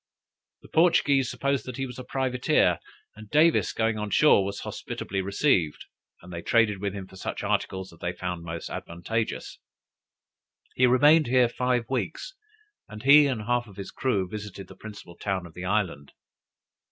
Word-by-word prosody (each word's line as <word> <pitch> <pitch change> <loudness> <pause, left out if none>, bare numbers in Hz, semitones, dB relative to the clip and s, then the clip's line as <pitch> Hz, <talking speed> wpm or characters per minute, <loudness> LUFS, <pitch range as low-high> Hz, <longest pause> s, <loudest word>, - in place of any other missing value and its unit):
The - - -13
Portuguese 145 -6 +3
supposed 140 -1 -1
that 125 - -6
he 135 - -2
was 125 -1 -9
a - - -6
privateer, 125 -1 +1 0.4
and 110 0 -12
Davis 155 +5 +4
going 110 -1 0
on 105 0 -3
shore 105 -3 +5
was 100 +1 -4
hospitably 95 0 -4
received, 95 - +1 0.4
and 90 0 -11
they 85 - -5
traded 105 -1 +2
with 100 -1 -2
him 95 -2 -6
for 95 - -16
such 95 - -5
articles 95 -3 -2
as 85 - -18
they 90 - -2
found 90 -1 -5
most 85 0 -6
advantageous. 110 +7 -4 1.1
He 125 - +4
remained 145 +5 +5
here 125 0 +4
five 125 0 0
weeks, 135 - -3 0.6
and 110 +1 -9
he 145 +2 +7
and 120 -6 -2
half 120 +1 0
of 100 -2 -15
his 100 - -7
crew 100 -8 -1
visited 100 -1 -8
the 95 - -12
principal 100 -4 -11
town 95 -3 -2
of 85 - -13
the 90 +2 -7
island. 90 -8 -1
105 Hz, 170 wpm, -26 LUFS, 95-130 Hz, 1.1 s, he